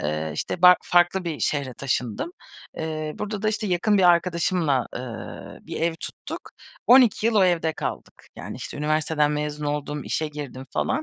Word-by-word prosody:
eee, 75 +1 -2
işte, 175 - -4
ba 180 0 +9
farklı 175 +1 +3
bir 165 -3 -3
şehre 140 -4 -1
taşındım. 125 - -2 0.5
Eee, 155 -1 -3
burada 210 -1 -4
da 215 - +2
işte, 215 0 -1
yakın 200 +3 +2
bir - - +4
arkadaşımla, 170 -5 +3
eee, 120 -2 -8
bir - - -6
ev 165 0 +1
tuttuk. - - -8 0.4
12 245 -3 +6
yıl 230 - +2
o 200 - +5
evde 170 -3 +2
kaldık. - - -6
Yani, - - -7
işte, - - -7
üniversiteden 150 0 +1
mezun 150 0 -3
oldum, 145 0 -3
işe 155 -1 -1
girdim 140 -3 -7
falan. 310 - 0
160 Hz, 170 wpm, -24 LUFS, 145-180 Hz, 0.5 s, ba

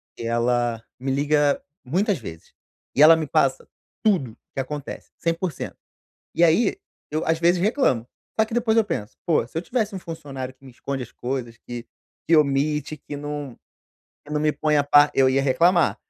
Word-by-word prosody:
que - - -8
ela, 120 0 0 0.2
me 135 +1 -2
liga 145 +1 +2 0.2
muitas 185 - 0
vezes, 80 -8 -10 0.4
e 140 - +3
ela 160 +2 +9
me 160 -1 -2
passa 135 0 +1 0.4
tudo 140 - +1 0.2
que - - -4
acontece, 145 +1 -6
100% 165 -1 -3 0.6
e 170 - +1
aí, 180 +6 +3 0.3
eu 155 +1 -1
às 160 0 +2
vezes 175 +1 +3
reclamo. 195 - +1 0.3
Só 220 - +5
que 225 - -7
depois 235 -2 +2
eu 225 - +5
penso: 110 - -4
"Pô, 155 -8 +2
se 145 - -15
eu - - -3
tivesse 215 +2 -1
um 190 - -3
funcionário 135 -6 -7
que 135 - -24
me 130 - -11
esconde 135 +2 -5
as 120 - -10
coisas, 120 -2 -4
que 120 0 -8 0.4
que 165 - +6
omite, 150 +1 +1
que 145 0 -8
não 145 -3 -5 0.7
que 150 - -10
não 150 - 0
me 155 0 +3
ponha 150 -1 +1
a 145 - -1
pa 145 +1 +6
eu 135 -1 +5
ia 135 +1 +2
reclamar", 170 +6 +3
145 Hz, 185 wpm, -23 LUFS, 130-165 Hz, 0.7 s, ela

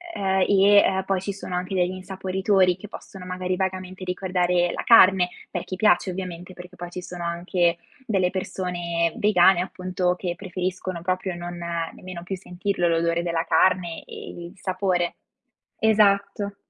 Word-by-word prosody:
ehm, 190 -1 +1
e, 200 +1 +5
ehm, 190 -1 +4
poi 190 -1 0
ci 200 - -3
sono 190 -2 -8
anche 180 +2 -3
degli 180 -1 +2
insaporitori 190 0 +1
che 205 +2 -10
possono 190 -2 -10
magari 185 0 -2
vagamente 185 0 -4
ricordare 180 -1 0
la - - -3
carne, 185 -5 +6 0.2
per - - -3
chi 185 - -5
piace 195 -2 +3
ovviamente, 180 -1 -6
perché 180 +1 -11
poi 175 0 -7
ci 180 +1 -6
sono 175 -1 -7
anche 170 0 0 0.3
delle 190 -4 +2
persone 175 -3 -2
vegane 190 -3 +5
appunto, 185 -1 -1
che 175 -2 -3
preferiscono 185 -1 -4
proprio 185 0 -1
non 175 0 -6 0.4
nemmeno 180 -2 -9
più 190 +2 -4
sentirlo 180 0 -2
l'odore 170 0 +1
della 170 -1 -1
carne 180 -3 +2
e - - -9 0.2
il - - -14
sapore. 185 -2 -1 0.6
Esatto. 205 -1 +2
185 Hz, 155 wpm, -24 LUFS, 175-190 Hz, 0.6 s, carne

